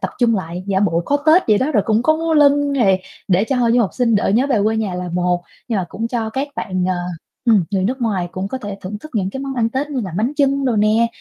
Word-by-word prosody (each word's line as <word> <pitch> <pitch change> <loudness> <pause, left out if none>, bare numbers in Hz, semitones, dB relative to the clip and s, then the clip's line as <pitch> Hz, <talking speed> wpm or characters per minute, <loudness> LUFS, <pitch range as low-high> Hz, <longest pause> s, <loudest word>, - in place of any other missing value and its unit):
tập - - -2
trung 235 -3 +3
lại 175 0 -5
giả 195 -1 +1
bộ 170 -4 +1
có 285 - +1
Tết 330 +4 +6
vậy 210 - +5
đó. 270 +5 0
Rồi 210 -7 +3
cũng 220 +1 +2
có 315 +4 +3
múa 325 0 -1
lân 285 -1 +4
này 195 -9 +2 0.3
để 190 +2 +3
cho 265 +3 -1
hội 235 -2 +2
du 245 - +4
học 200 - +1
sinh 240 -3 +2
đỡ 205 - +1
nhớ 250 +5 +3
về 255 -6 +1
quê 220 +1 +1
nhà 205 -5 -2
là 180 0 -4
một, 180 0 0 0.3
nhưng 225 - 0
mà 185 - -1
cũng 225 +5 -4
cho 225 -3 -2
các 270 +5 -3
bạn, 185 -3 -2
ờ, 185 - +1 0.5
ừm, 215 -6 +4
người 195 -2 0
nước 255 +6 -2
ngoài 195 -6 -1
cũng 190 +1 -4
có 260 - -4
thể 205 -4 -7
thưởng 205 +3 -6
thức 310 +8 -12
những 195 -3 0
cái 270 - -6
món 275 -1 -4
ăn 230 -2 +1
Tết 270 +5 -3
như 270 - -2
là 195 -5 -5
bánh 230 +7 0
chưng 275 -1 +2
đồ 245 -4 +1
nè, 215 +2 +3
225 Hz, 295 wpm, -19 LUFS, 195-265 Hz, 0.5 s, Tết